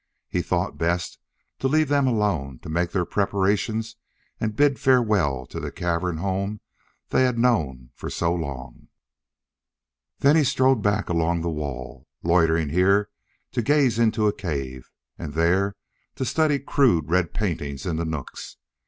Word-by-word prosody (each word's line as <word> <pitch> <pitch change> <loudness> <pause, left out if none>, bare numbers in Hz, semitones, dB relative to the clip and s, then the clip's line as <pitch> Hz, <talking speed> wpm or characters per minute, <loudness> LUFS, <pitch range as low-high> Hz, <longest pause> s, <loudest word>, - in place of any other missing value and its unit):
He - - -1
thought - - -2
best 85 +1 -1 0.4
to 135 - +1
leave 155 +2 +2
them 140 -1 +2
alone 100 - 0
to - - -8
make 85 +2 0
their 90 -1 0
preparations 100 +3 0 0.4
and 110 -1 -2
bid 140 +1 +3
farewell 105 - +2
to - - -7
the - - -5
cavern 85 -1 -1
home 100 +4 -2 0.5
they - - +2
had 125 -2 +1
known 75 - 0
for - - -7
so 85 0 0
long. 70 -7 -6 1.3
Then 140 +2 +4
he 160 - +5
strolled 130 -2 +3
back 105 0 +1
along 85 0 0
the 85 0 -2
wall, 70 -4 -6 0.2
loitering 80 -2 +3
here 100 +5 +3 0.4
to 120 - 0
gaze 130 -2 +2
into 110 -2 +2
a 105 - +3
cave, 70 -9 -5 0.3
and 75 - -6
there 95 +5 +2 0.4
to 130 - -2
study 155 +2 +2
crude 125 - +2
red 85 0 +1
paintings 75 -9 -3
in 85 -3 -1
the 85 - -1
nooks. 80 -4 -6
95 Hz, 155 wpm, -24 LUFS, 80-115 Hz, 1.3 s, he